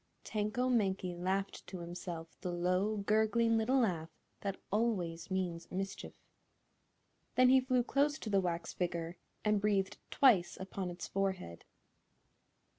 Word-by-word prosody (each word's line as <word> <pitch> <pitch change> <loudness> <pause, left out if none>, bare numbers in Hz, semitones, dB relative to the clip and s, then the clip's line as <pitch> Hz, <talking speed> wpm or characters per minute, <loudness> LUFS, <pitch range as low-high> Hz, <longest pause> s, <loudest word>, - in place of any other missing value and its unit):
Tanko 215 +4 -1
Mankie 195 -7 +1
laughed 190 +3 -2
to 190 - -6
himself 170 -1 -6
the 180 - -2
low, 180 +5 +1
gurgling 220 +3 +3
little 250 +4 +3
laugh 170 -8 0 0.3
that 195 -1 -3
always 190 -7 0
means 180 -3 -2
mischief. 195 +1 -4 1.2
Then 255 0 +6
he 260 0 +7
flew 255 -1 +2
close 285 +4 +2
to 225 - -6
the 195 -1 +4
wax 170 -2 -2
figure 170 -1 -2 0.3
and 210 -1 +3
breathed 200 -2 +1
twice 220 -10 +4
upon 190 -1 -4
its 175 0 -6
forehead. 190 - -2
195 Hz, 130 wpm, -34 LUFS, 175-220 Hz, 1.2 s, he